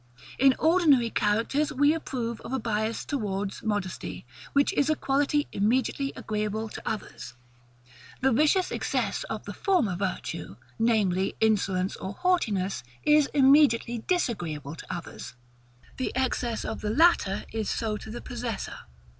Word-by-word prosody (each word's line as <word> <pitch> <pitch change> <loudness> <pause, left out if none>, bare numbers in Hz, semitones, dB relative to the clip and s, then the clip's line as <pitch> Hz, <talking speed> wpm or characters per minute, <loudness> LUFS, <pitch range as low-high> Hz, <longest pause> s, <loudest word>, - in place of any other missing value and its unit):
In 270 0 +6
ordinary 310 -8 +4
characters, 230 +8 +1
we 290 +2 +4
approve 240 -7 -4
of - - -8
a 265 - 0
bias 220 -1 -2
towards 200 -7 -3
modesty, 205 - -3 0.3
which 280 0 +3
is 285 +1 +2
a 310 - +3
quality 290 +1 +1
immediately 260 +6 0
agreeable 215 +1 -3
to - - -8
others: 205 - -6 0.8
the 265 0 +3
vicious 305 +9 +3
excess - - -1
of - - -5
the - - -6
former 345 - +1
virtue, 185 - -4 0.2
namely, 200 -5 +2
insolence 195 -4 +1
or 190 - -5
haughtiness, 210 - 0 0.2
is 300 -1 +5
immediately 265 -4 +5
disagreeable 175 - -1
to - - -9
others; 165 -6 -7 0.6
the 260 - -2
excess 250 -3 -1
of - - -4
the 210 - -2
latter 225 - +3
is 220 -2 -2
so 220 -2 -1
to 220 - -10
the 235 - -6
possessor. 240 -3 -5
230 Hz, 140 wpm, -27 LUFS, 205-280 Hz, 0.8 s, In